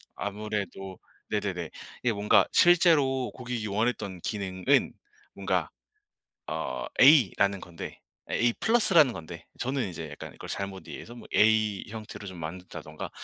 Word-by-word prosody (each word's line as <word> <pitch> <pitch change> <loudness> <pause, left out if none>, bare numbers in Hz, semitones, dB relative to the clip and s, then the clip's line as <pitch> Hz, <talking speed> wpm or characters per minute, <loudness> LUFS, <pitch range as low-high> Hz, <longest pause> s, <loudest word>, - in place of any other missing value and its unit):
아무래도 100 -2 -4 0.3
네네네 95 -6 -2 0.3
이게 120 -2 +2
뭔가 105 0 +4
실제로 155 -7 +4
고객이 125 -3 -4
원했던 100 -3 -1
기능은 100 +8 0 0.4
뭔가 - - -1 0.8
어 - - -3 0.2
A라는 100 - +5
건데 85 -1 -8 0.3
A+라는 160 - +4
건데 85 -4 -9
저는 130 -4 -1
이제 80 -2 -6
약간 75 - -9
이걸 - - -10
잘못 95 -1 -5
이해해서 120 - -9
뭐 120 - -11
A 110 -2 +3
형태로 110 -2 -8
좀 95 -1 -8
만든다든가 80 -2 -7
105 Hz, 275 characters per minute, -28 LUFS, 95-125 Hz, 0.8 s, A라는